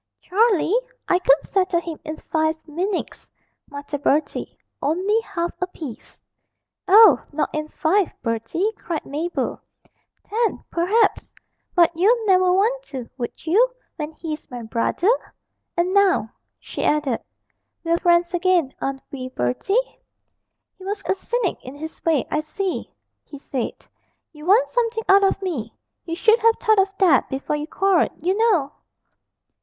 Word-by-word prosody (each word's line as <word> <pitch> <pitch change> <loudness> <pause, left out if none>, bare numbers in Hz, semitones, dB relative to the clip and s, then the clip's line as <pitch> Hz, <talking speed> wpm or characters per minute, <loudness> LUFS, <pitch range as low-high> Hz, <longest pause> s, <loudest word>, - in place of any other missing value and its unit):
'Charlie! 405 -1 +2 0.3
I 360 - +3
could 285 -5 +4
settle 375 -3 +1
him 335 -2 -7
in 310 0 -6
five 315 0 0
minutes,' 360 +5 -4 0.4
muttered 285 0 -6
Bertie, 295 +2 0 0.2
only 375 +9 +1
half 360 -6 -3
appeased. 320 - -7 0.6
'Oh, 395 - +7
not 300 +1 -1
in 305 0 -2
five, 355 +4 +1
Bertie,' 230 - -1
cried 335 -3 -4
Mabel, 320 +5 -3 0.7
'ten, 450 +2 -1
perhaps; 400 +5 +1 0.4
but 345 -2 +5
you'd 440 +7 +3
never 370 -2 +4
want 440 +7 +2
to, 260 - -7
would 240 +4 -6
you, 430 +10 +4 0.3
when 300 -1 -4
he's 310 -1 -6
my 245 -3 -7
brother? 230 - -1 0.7
And 350 +2 +1
now,' 380 - +3 0.3
she - - -6
added, 295 -6 +1 0.6
'we're 335 0 +1
friends 345 0 +3
again, 350 -5 +2
aren't 270 0 -3
we, 255 -2 -6
Bertie?' 260 - -1 0.8
He - - -12
was 400 +2 -4
a - - +2
cynic 410 +1 -2
in 255 +2 -9
his 315 +2 -9
way 320 -5 +2
'I - - +1
see,' 365 +5 -4 0.3
he 285 - -11
said, 265 -3 -5 0.5
'you 300 +1 -11
want 430 +6 +5
something 460 -2 -1
out 395 +1 +6
of 390 0 +1
me; 320 - -4 0.3
you 330 -1 -3
should 440 +6 +4
have 455 0 +4
thought 435 -3 +3
of 390 0 +3
that 345 -9 +4
before 270 +2 -2
you 295 +1 -4
quarrelled, 390 0 +2
you 365 +5 0
know!' 400 -11 +2
345 Hz, 145 wpm, -22 LUFS, 300-395 Hz, 0.8 s, Oh